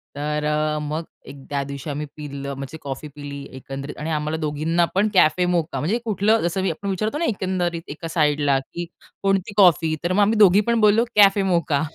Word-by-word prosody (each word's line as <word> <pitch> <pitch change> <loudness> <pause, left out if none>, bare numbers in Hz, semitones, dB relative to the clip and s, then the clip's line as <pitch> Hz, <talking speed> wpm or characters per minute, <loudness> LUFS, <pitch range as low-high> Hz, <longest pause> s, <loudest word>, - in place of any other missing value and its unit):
तर 150 +1 -2
अ, 150 0 0
मग 155 +2 -3 0.3
एक - - -9
त्या 140 -1 -1
दिवशी 140 +1 -7
आम्ही 150 +1 -3
पिलं 140 -2 -6
म्हणजे 140 +3 -7
कॉफी 140 +2 -6
पिली 140 -1 -7
एकंदरीत 135 +2 -7
आणि 155 +2 -4
आम्हाला 155 0 -1
दोघींना 160 +2 0
पण 200 +3 +3
कॅफे 180 -1 +4
मोका 170 -5 -1
म्हणजे 180 - 0
कुठलं 215 +1 +2
जसं 175 +3 -1
मी 190 - 0
आपण 200 +5 -5
विचारतो 215 +8 -1
ना, 335 - 0
एकंदरीत 185 - -1
एका 155 +3 -7
साईडला 150 -3 +2
की 170 +6 -7 0.4
कोणती 195 +1 0
कॉफी? 165 -5 +5
तर 180 +1 0
मग 205 - +3
आम्ही 215 +2 +3
दोघी 205 -1 +6
पण 235 - +2
बोललो 215 +2 +5
"कॅफे 200 -1 +6
मोका" 170 -6 +1
160 Hz, 195 wpm, -22 LUFS, 145-190 Hz, 0.4 s, दोघी